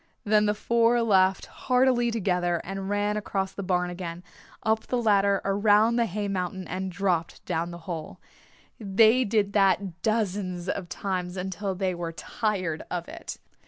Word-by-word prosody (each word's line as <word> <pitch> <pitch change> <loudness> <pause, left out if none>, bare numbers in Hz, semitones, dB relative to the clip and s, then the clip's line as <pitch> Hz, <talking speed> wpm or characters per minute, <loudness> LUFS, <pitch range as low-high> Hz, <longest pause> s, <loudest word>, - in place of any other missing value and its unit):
Then 210 0 +3
the 210 - +1
four 235 +2 +2
laughed 190 -3 +3
heartily 250 -2 +2
together 180 -6 0
and 195 +1 -5
ran 205 +1 0
across 195 -2 -2
the 200 - -6
barn 180 -2 0
again, 175 -1 -6 0.4
up 220 0 0
the 250 - 0
ladder, 200 -3 +3
around 210 +3 +4
the 235 -1 +2
hay 205 +1 -3
mountain 185 -2 -3
and 185 +2 -4
dropped 180 -3 -1
down 170 -1 -1
the 170 - -7
hole. 160 -4 -6 0.6
They 220 +4 +4
did 205 -2 0
that 195 -3 +2
dozens 195 -5 -1
of 180 -3 -3
times 185 -2 -3
until 190 +1 -3
they 185 0 -1
were 170 -1 -5
tired 185 -2 -2
of 175 -1 -4
it. - - -8
195 Hz, 160 wpm, -26 LUFS, 180-210 Hz, 0.6 s, around